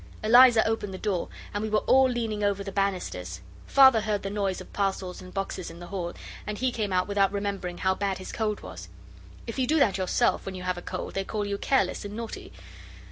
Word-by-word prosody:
Eliza 240 0 +7
opened 220 -3 -1
the 190 - -6
door, 190 -3 -1 0.3
and 205 - -2
we 220 - -2
were 215 0 +1
all 265 0 +5
leaning 225 -4 -2
over 200 -1 +1
the 195 - -6
banisters. 180 - -2 0.3
Father 265 -5 +7
heard 210 -1 -1
the 195 - -3
noise 200 -2 -1
of - - -12
parcels 195 -2 -2
and 185 - -11
boxes 195 -2 -4
in 165 - -11
the 175 - -8
hall, 175 -2 -4 0.3
and 210 0 -3
he 255 +2 0
came 215 -4 -2
out 185 0 +1
without 200 -1 +2
remembering 200 -3 -3
how 190 0 +2
bad 195 -1 -2
his 185 - -8
cold 215 -2 -2
was. - - -9 0.6
If 230 +3 -5
you 255 - +1
do 315 - +3
that 205 -10 +3
yourself 185 - +1
when 190 - -6
you 180 - -7
have 180 -1 -1
a - - -11
cold 185 +1 -5
they 195 - -1
call 210 +1 -3
you 200 0 -3
careless 270 -3 +1
and 205 0 -7
naughty. 230 0 -7
200 Hz, 230 wpm, -27 LUFS, 190-220 Hz, 0.6 s, Eliza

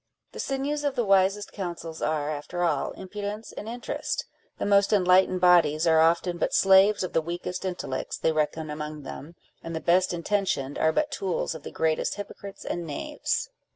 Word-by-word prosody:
The - - -10
sinews 280 +2 -2
of 285 -2 0
the 240 -3 0
wisest 195 +1 +3
councils 170 -4 -6
are, 150 -1 0
after 155 +4 -4
all, 170 - +1
impudence 205 +3 -6
and 215 - -7
interest: 240 +2 -3 0.3
the - - -2
most 200 -1 +4
enlightened 185 -2 +4
bodies 170 -3 +5
arc 160 -1 +5
often 170 +2 +2
but - - 0
slaves 195 +1 +5
of 185 - -4
the 165 - +3
weakest 175 +3 -5
intellects 175 -8 -3
they 160 - +1
reckon 155 0 -1
among 150 0 -6
them, 155 +4 -9 0.3
and 165 0 -5
the - - -1
best 180 +3 +3
intentioned 175 -6 -1
are 160 - +3
but 295 - 0
tools 195 -13 -2
of 160 - -8
the - - -7
greatest 160 -1 0
hypocrites 200 -1 -9
and 175 - -3
knaves. 145 - -2
180 Hz, 180 wpm, -26 LUFS, 160-200 Hz, 0.3 s, bodies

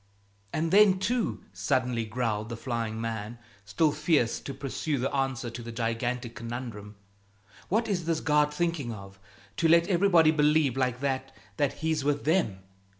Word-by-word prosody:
"And 160 +1 -1
then, 200 -1 +6
too," 225 +5 -1
suddenly 125 -4 0
growled 110 -1 -2
the 115 - -5
flying 115 -3 -3
man, 115 0 -4 0.3
still 155 +8 +2
fierce 150 -6 +1
to - - -7
pursue 140 +2 -3
the 135 +3 -2
answer 135 -3 -1
to 120 +1 -7
the 115 0 -7
gigantic 115 +1 -2
conundrum, 115 -3 -7 0.7
"what 225 +4 +1
is 185 -6 -1
this 165 -1 0
God 150 -1 +2
thinking 160 -5 -1
of 100 -2 -10 0.4
to 165 - +3
let 170 +1 +5
everybody 175 -4 +5
believe 150 -3 +3
like 125 -1 -1
that 135 -1 -2 0.2
that 145 -3 +1
He's 160 -3 +1
with 145 0 0
them? 150 - +1
135 Hz, 155 wpm, -28 LUFS, 115-160 Hz, 0.7 s, then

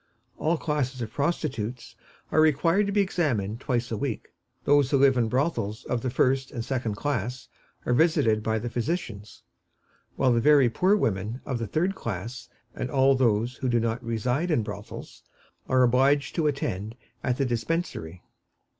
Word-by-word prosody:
All 165 +2 +1
classes 140 -5 -2
of 110 - -7
prostitutes 135 -6 -2 0.4
are 155 - +4
required 165 +6 +3
to - - -1
be 205 0 +3
examined 120 - -1
twice 120 -3 -2
a 110 - -1
week; 125 0 -4 0.3
those 145 -2 +4
who 140 - +3
live 135 -1 +5
in 120 -3 +1
brothels 120 -5 -1
of 120 - -1
the 130 - -1
first 130 +2 +1
and 115 -1 -5
second 120 -5 -2
class 125 -1 -3 0.4
are 125 - +1
visited 130 -7 +3
by 110 +1 0
the 115 +2 -3
physicians, 120 - -4 0.7
while 130 -2 +3
the 115 - +2
very 140 -3 +5
poor 190 - +3
women 110 - -1
of 130 -4 -2
the 115 - -3
third 175 - 0
class, 115 - -6 0.2
and 125 - -4
all 135 0 +4
those 120 -1 +1
who 130 - -2
do 120 -1 +2
not 115 +2 -2
reside 125 +8 -1
in 150 -9 +2
brothels, - - -8 0.5
are 130 -1 +4
obliged 135 +4 +3
to 160 -3 +1
attend 110 -7 -3 0.3
at 125 -2 0
the 140 - +1
Dispensary. 120 - -3
125 Hz, 170 wpm, -26 LUFS, 115-145 Hz, 0.7 s, live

